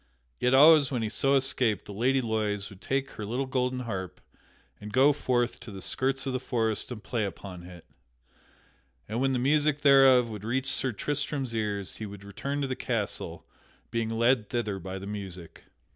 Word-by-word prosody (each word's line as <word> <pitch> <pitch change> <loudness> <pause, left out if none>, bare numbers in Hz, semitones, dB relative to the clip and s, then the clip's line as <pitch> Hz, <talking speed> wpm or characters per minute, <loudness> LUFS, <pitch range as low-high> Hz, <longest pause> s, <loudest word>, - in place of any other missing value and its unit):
Yet 125 +1 +3
always 150 0 +7
when 125 -4 -2
he 110 - -1
so 135 +5 +2
escaped 130 -5 +1
the 105 - -8
Lady 130 +6 +2
Loise 105 -3 -2
would 95 0 -14
take 135 +5 -1
her 110 - -7
little 120 +6 -2
golden 125 -1 -1
harp 95 -6 -5 0.6
and 105 0 -8
go 135 +5 +5
forth 125 -4 0
to - - -10
the 100 -2 -8
skirts 135 +7 0
of 135 - -2
the 130 - -1
forest 115 -4 -1
and 110 -4 -7
play 115 -3 -2
upon 95 -2 -6
it, 90 -1 -12 1.2
and 115 +4 -2
when 135 0 +2
the - - +1
music 145 +3 +2
thereof 135 -3 +6
would 105 -3 -7
reach 130 +4 -1
Sir 130 - 0
Tristram's 140 +2 -3
ears 105 -3 -3
he 110 - -5
would 100 -1 -10
return 140 +8 -4
to 140 - -1
the 130 - -2
castle, 115 -7 -3 0.5
being 115 -1 -1
led 115 -1 +2
thither 105 -5 -2
by 95 +1 -6
the 95 - -7
music. 95 -4 -8
120 Hz, 190 wpm, -28 LUFS, 105-135 Hz, 1.2 s, always